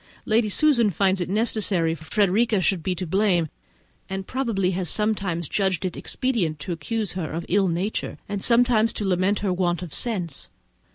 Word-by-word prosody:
Lady 220 Hz, 0 st, +2 dB
Susan 240 Hz, -2 st, +4 dB
finds 190 Hz, 0 st, +1 dB
it 175 Hz, -, -2 dB
necessary 200 Hz, -5 st, +1 dB
that 160 Hz, -, -9 dB
Frederica 210 Hz, +3 st, +2 dB
should 185 Hz, -1 st, +1 dB
be 180 Hz, +3 st, -1 dB
to 180 Hz, +1 st, -4 dB
blame, 180 Hz, -2 st, +1 dB, 0.6 s
and 190 Hz, 0 st, -4 dB
probably 225 Hz, -8 st, -1 dB
has 180 Hz, -2 st, -2 dB
sometimes 195 Hz, -6 st, -1 dB
judged 190 Hz, -1 st, 0 dB
it 180 Hz, -, -3 dB
expedient 220 Hz, -, -1 dB
to 145 Hz, +5 st, -6 dB
accuse 215 Hz, +5 st, -2 dB
her 175 Hz, -4 st, -4 dB
of 165 Hz, +2 st, -4 dB
ill 195 Hz, +1 st, +2 dB
nature 180 Hz, +5 st, -2 dB
and 200 Hz, -1 st, -3 dB
sometimes 235 Hz, -1 st, +3 dB
to 210 Hz, -, -4 dB
lament 185 Hz, +2 st, +1 dB
her 195 Hz, -3 st, 0 dB
want 175 Hz, -1 st, 0 dB
of 170 Hz, -, -8 dB
sense. 180 Hz, -, -3 dB
190 Hz, 175 wpm, -24 LUFS, 175-215 Hz, 0.6 s, Susan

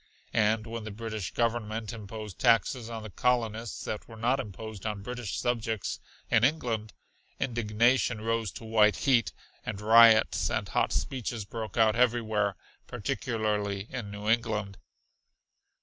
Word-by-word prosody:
And 110 Hz, 0 st, +2 dB
when 115 Hz, -1 st, -5 dB
the 110 Hz, -, -6 dB
British 110 Hz, -2 st, -5 dB
Government 115 Hz, -1 st, -1 dB
imposed 105 Hz, -2 st, -8 dB
taxes 115 Hz, 0 st, +2 dB
on 115 Hz, -1 st, -6 dB
the 110 Hz, -, -8 dB
colonists 115 Hz, -1 st, -1 dB
that 105 Hz, -, -5 dB
were 115 Hz, -, -11 dB
not 125 Hz, +4 st, +1 dB
imposed 110 Hz, -3 st, -7 dB
on 105 Hz, -2 st, -3 dB
British 120 Hz, -4 st, -4 dB
subjects 115 Hz, -4 st, -2 dB, 0.3 s
in 110 Hz, -, +4 dB
England, 120 Hz, -7 st, 0 dB, 0.5 s
indignation 120 Hz, 0 st, +2 dB
rose 115 Hz, -1 st, -1 dB
to 115 Hz, -, -9 dB
white 110 Hz, -1 st, +4 dB
heat, 125 Hz, -6 st, +2 dB, 0.3 s
and 100 Hz, -, -4 dB
riots 110 Hz, +1 st, +6 dB
and -, -, -1 dB
hot -, -, +1 dB
speeches 120 Hz, -5 st, -2 dB
broke 110 Hz, 0 st, -6 dB
out 110 Hz, -1 st, +4 dB
everywhere, 110 Hz, -4 st, +2 dB, 0.3 s
particularly 105 Hz, -3 st, -2 dB
in 125 Hz, -6 st, -5 dB
New 105 Hz, +1 st, -7 dB
England. 110 Hz, -4 st, 0 dB
110 Hz, 135 wpm, -29 LUFS, 105-115 Hz, 0.5 s, riots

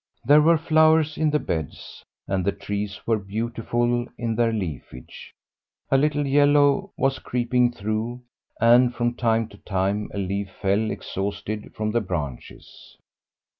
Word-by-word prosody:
There 145 Hz, +4 st, +6 dB
were 165 Hz, +2 st, +5 dB
flowers 155 Hz, -1 st, +3 dB
in 155 Hz, -1 st, +1 dB
the 150 Hz, -, +2 dB
beds, 80 Hz, -, -5 dB, 0.2 s
and 95 Hz, -1 st, -1 dB
the 100 Hz, -, +1 dB
trees 100 Hz, 0 st, -5 dB
were 115 Hz, -2 st, +1 dB
beautiful 120 Hz, +3 st, -2 dB
in 115 Hz, 0 st, -2 dB
their 115 Hz, 0 st, +1 dB
leafage. 80 Hz, -, -7 dB, 0.6 s
A 135 Hz, -, +5 dB
little 145 Hz, 0 st, +1 dB
yellow 145 Hz, +6 st, +3 dB
was 135 Hz, 0 st, 0 dB
creeping 125 Hz, 0 st, +1 dB
through, 110 Hz, +2 st, -3 dB, 0.4 s
and 120 Hz, +1 st, +5 dB
from 120 Hz, 0 st, 0 dB
time 115 Hz, -2 st, +1 dB
to 100 Hz, -, -15 dB
time 100 Hz, +2 st, -2 dB
a -, -, -7 dB
leaf 100 Hz, 0 st, -2 dB
fell 100 Hz, +3 st, +1 dB
exhausted 100 Hz, +2 st, -5 dB
from 110 Hz, 0 st, -2 dB
the 120 Hz, +1 st, +1 dB
branches. 75 Hz, -, -7 dB
115 Hz, 140 wpm, -24 LUFS, 100-135 Hz, 0.6 s, There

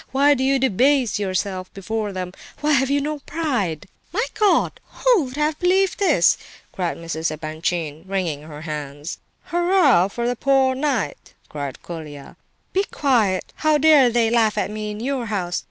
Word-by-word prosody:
Why 280 Hz, +2 st, +4 dB
do 260 Hz, -2 st, -1 dB
you 270 Hz, +1 st, +3 dB
debase 260 Hz, -2 st, +2 dB
yourself 185 Hz, -1 st, -2 dB
before 210 Hz, +2 st, -3 dB
them? 185 Hz, -1 st, -5 dB, 0.3 s
Why 300 Hz, +1 st, +1 dB
have 270 Hz, -2 st, +3 dB
you 285 Hz, 0 st, +2 dB
no 300 Hz, +1 st, -3 dB
pride?" 250 Hz, -, -2 dB, 0.3 s
"My 450 Hz, +7 st, 0 dB
God! 420 Hz, -2 st, +2 dB, 0.3 s
Who 470 Hz, -, +5 dB
would 255 Hz, -, -8 dB
ever -, -, -1 dB
have 300 Hz, 0 st, 0 dB
believed 375 Hz, +2 st, +2 dB
this?" 305 Hz, -, +4 dB, 0.3 s
cried 180 Hz, -3 st, -3 dB
Mrs. 165 Hz, -1 st, -3 dB
Epanchin, 155 Hz, +1 st, -3 dB
wringing 180 Hz, -7 st, -2 dB
her 150 Hz, -1 st, -10 dB
hands. 150 Hz, 0 st, -6 dB, 0.3 s
"Hurrah 345 Hz, -, +4 dB
for 235 Hz, +4 st, -4 dB
the 245 Hz, -, 0 dB
'poor 265 Hz, +1 st, +3 dB
knight'!" 260 Hz, -, -2 dB
cried 140 Hz, -3 st, -6 dB
Colia. 150 Hz, -5 st, -9 dB, 0.4 s
"Be 390 Hz, -, +2 dB
quiet! 230 Hz, -, 0 dB
How 310 Hz, -1 st, +3 dB
dare 295 Hz, -4 st, +6 dB
they 230 Hz, -1 st, +2 dB
laugh 225 Hz, -3 st, +2 dB
at -, -, -1 dB
me 215 Hz, 0 st, -4 dB
in 210 Hz, +1 st, -6 dB
your 255 Hz, -1 st, -2 dB
house?" 185 Hz, -4 st, -2 dB
225 Hz, 170 wpm, -22 LUFS, 175-285 Hz, 0.4 s, dare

